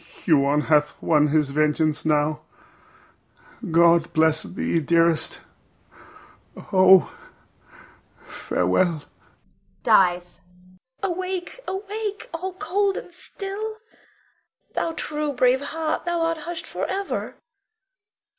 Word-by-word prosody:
Huon 145 Hz, -3 st, +3 dB
hath 150 Hz, -1 st, +1 dB
won 150 Hz, -2 st, +3 dB
his 150 Hz, -1 st, +1 dB
vengeance 155 Hz, +1 st, +1 dB
now. 150 Hz, 0 st, +1 dB, 1.3 s
God 170 Hz, 0 st, +4 dB
bless 160 Hz, 0 st, +3 dB
thee, 170 Hz, -, -2 dB
dearest. 165 Hz, +1 st, +1 dB, 1.3 s
Oh, 185 Hz, -1 st, +6 dB, 1.1 s
farewell! 150 Hz, -, 0 dB, 0.8 s
[Dies.] 180 Hz, -1 st, +2 dB, 0.6 s
Bianca. 370 Hz, -4 st, 0 dB
Awake! 370 Hz, +4 st, -5 dB
awake! 410 Hz, +1 st, -5 dB
All, 365 Hz, +3 st, -4 dB
cold 385 Hz, +3 st, -1 dB
and 355 Hz, -, -9 dB
still! 405 Hz, +4 st, -6 dB, 1.0 s
Thou 330 Hz, -, -1 dB
true, 300 Hz, -2 st, -3 dB
brave 255 Hz, +1 st, +3 dB
heart, 315 Hz, +2 st, -3 dB
thou 345 Hz, -1 st, -1 dB
art 330 Hz, 0 st, 0 dB
hushed 345 Hz, -1 st, -5 dB
forever. 395 Hz, +1 st, -4 dB
185 Hz, 90 wpm, -23 LUFS, -, 1.3 s, Oh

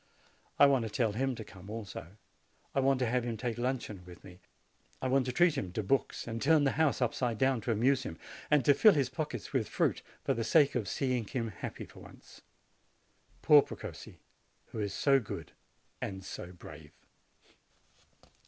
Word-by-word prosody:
I -, -, +8 dB
want 135 Hz, -3 st, +4 dB
to 110 Hz, -, -3 dB
tell 115 Hz, -1 st, 0 dB
him 130 Hz, +4 st, -1 dB
to 115 Hz, -, -7 dB
come 95 Hz, -1 st, -13 dB
also; 105 Hz, -3 st, -7 dB, 0.6 s
I -, -, +1 dB
want 135 Hz, 0 st, +3 dB
to -, -, +3 dB
have 125 Hz, +1 st, 0 dB
him 120 Hz, -2 st, -3 dB
take 120 Hz, 0 st, -3 dB
luncheon 120 Hz, -6 st, -3 dB
with 90 Hz, -1 st, -13 dB
me; 90 Hz, -1 st, -13 dB, 0.6 s
I 130 Hz, -, -2 dB
want 130 Hz, 0 st, +2 dB
to -, -, 0 dB
treat 175 Hz, +4 st, +4 dB
him 95 Hz, -10 st, -3 dB
to 110 Hz, -, -2 dB
books, 130 Hz, +7 st, 0 dB
and 115 Hz, 0 st, -4 dB
turn 155 Hz, +1 st, +4 dB
the 135 Hz, -, +3 dB
house 155 Hz, -5 st, +2 dB
up 120 Hz, -, 0 dB
side 120 Hz, -4 st, -1 dB
down 130 Hz, -2 st, +2 dB
to 120 Hz, -, -1 dB
amuse 125 Hz, +5 st, +2 dB
him, 80 Hz, -, -6 dB, 0.3 s
and 145 Hz, -5 st, +3 dB
to 145 Hz, -, +7 dB
fill 215 Hz, +8 st, +6 dB
his 135 Hz, -4 st, +1 dB
pockets 135 Hz, -7 st, -5 dB
with -, -, 0 dB
fruit, -, -, 0 dB, 0.2 s
for -, -, +1 dB
the 115 Hz, -, -2 dB
sake 140 Hz, +5 st, +4 dB
of 115 Hz, -6 st, -2 dB
seeing 125 Hz, -4 st, -1 dB
him 115 Hz, -1 st, -3 dB
happy 95 Hz, -, -7 dB
for -, -, -15 dB
once, -, -, -15 dB, 1.0 s
Poor 150 Hz, -1 st, +8 dB
Precossi! -, -, -9 dB, 0.5 s
who 110 Hz, -, -5 dB
is 100 Hz, -2 st, -2 dB
so 135 Hz, +3 st, +4 dB
good 110 Hz, -, -7 dB, 0.5 s
and 95 Hz, -1 st, -5 dB
so 90 Hz, -, -7 dB
brave 80 Hz, -4 st, -12 dB
120 Hz, 190 wpm, -31 LUFS, 105-135 Hz, 1.0 s, I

